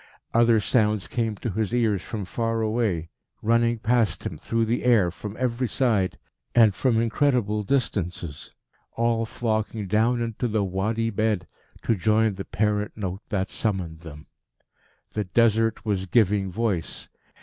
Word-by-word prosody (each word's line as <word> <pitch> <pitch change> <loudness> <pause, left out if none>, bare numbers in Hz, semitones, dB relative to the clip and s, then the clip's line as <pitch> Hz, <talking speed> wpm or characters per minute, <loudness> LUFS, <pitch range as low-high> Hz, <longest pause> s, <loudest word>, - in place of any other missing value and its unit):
Other 115 -1 +5
sounds 105 -2 +1
came 115 -3 -1
to 110 +3 -4
his 110 +3 -1
ears 110 -6 +2
from 105 -1 -5
far 115 +4 -1
away, 110 -7 -1 0.3
running 115 +1 +3
past 115 -1 +1
him - - -3
through 115 0 -1
the 115 +2 -1
air 110 -8 +4
from 105 +4 -8
every 125 0 0
side, 110 -7 +1 0.4
and 110 -4 +6
from 115 +3 +1
incredible 115 -3 +1
distances, 90 - -2 0.4
all 115 -1 +1
flocking 110 -2 -2
down 110 +5 +2
into 115 +1 -2
the 110 -2 0
Wadi 110 +5 -1
bed 105 -3 0 0.4
to - - +2
join 110 +2 +2
the 95 0 -6
parent 105 0 0
note 95 -1 -4
that 100 -4 -1
summoned 95 -7 -2
them. 75 -2 -11 0.9
The 105 -1 -1
Desert 115 +2 +2
was 95 -3 -1
giving 100 -2 +2
voice. 100 -4 -2
110 Hz, 145 wpm, -25 LUFS, 100-115 Hz, 0.9 s, and